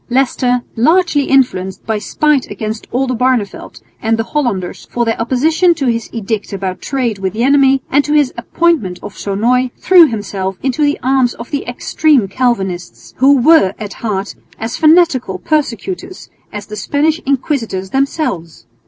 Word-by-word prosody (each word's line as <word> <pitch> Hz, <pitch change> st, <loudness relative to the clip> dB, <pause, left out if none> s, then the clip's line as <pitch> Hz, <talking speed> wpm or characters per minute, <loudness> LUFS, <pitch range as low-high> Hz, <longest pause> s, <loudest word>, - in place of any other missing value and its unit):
Leicester, 250 Hz, -1 st, +1 dB
largely 310 Hz, +3 st, +2 dB
influenced 190 Hz, -9 st, 0 dB
by 220 Hz, -1 st, -1 dB
spite 290 Hz, +6 st, 0 dB
against 215 Hz, +2 st, -5 dB
Oldenbarneveldt 255 Hz, -4 st, -1 dB, 0.2 s
and 225 Hz, 0 st, +1 dB
the 225 Hz, -, 0 dB
Hollanders 225 Hz, -10 st, -3 dB
for 240 Hz, -1 st, -1 dB
their 225 Hz, 0 st, -1 dB
opposition 315 Hz, +9 st, +2 dB
to 280 Hz, -, -2 dB
his 230 Hz, -2 st, -1 dB
edict 220 Hz, -2 st, -4 dB
about 190 Hz, -1 st, -4 dB
trade 245 Hz, -7 st, -2 dB
with 190 Hz, -1 st, -2 dB
the 230 Hz, +2 st, -1 dB
enemy 270 Hz, -1 st, +4 dB
and 285 Hz, +2 st, +3 dB
to 295 Hz, -, -1 dB
his 290 Hz, -4 st, +2 dB
appointment 240 Hz, -, 0 dB
of 200 Hz, -, -8 dB
Sonoy, 240 Hz, +6 st, 0 dB
threw 355 Hz, -3 st, +6 dB
himself 195 Hz, -5 st, -4 dB
into 265 Hz, +2 st, -1 dB
the 290 Hz, 0 st, +1 dB
arms 260 Hz, -2 st, +2 dB
of 235 Hz, -, -10 dB
the 285 Hz, -, -3 dB
extreme 255 Hz, 0 st, +1 dB
Calvinists, 195 Hz, -6 st, -2 dB
who 275 Hz, +2 st, +5 dB
were 255 Hz, -, +4 dB
at 205 Hz, -3 st, -7 dB
heart 205 Hz, -3 st, -3 dB, 0.2 s
as 225 Hz, +2 st, -4 dB
fanatical 310 Hz, -, +3 dB
persecutors 310 Hz, -, -3 dB, 0.2 s
as 205 Hz, -1 st, -7 dB
the 210 Hz, -, -8 dB
Spanish 295 Hz, -, 0 dB
inquisitors 245 Hz, -9 st, -2 dB
themselves. 265 Hz, -, -2 dB
245 Hz, 155 wpm, -15 LUFS, 210-285 Hz, 0.2 s, threw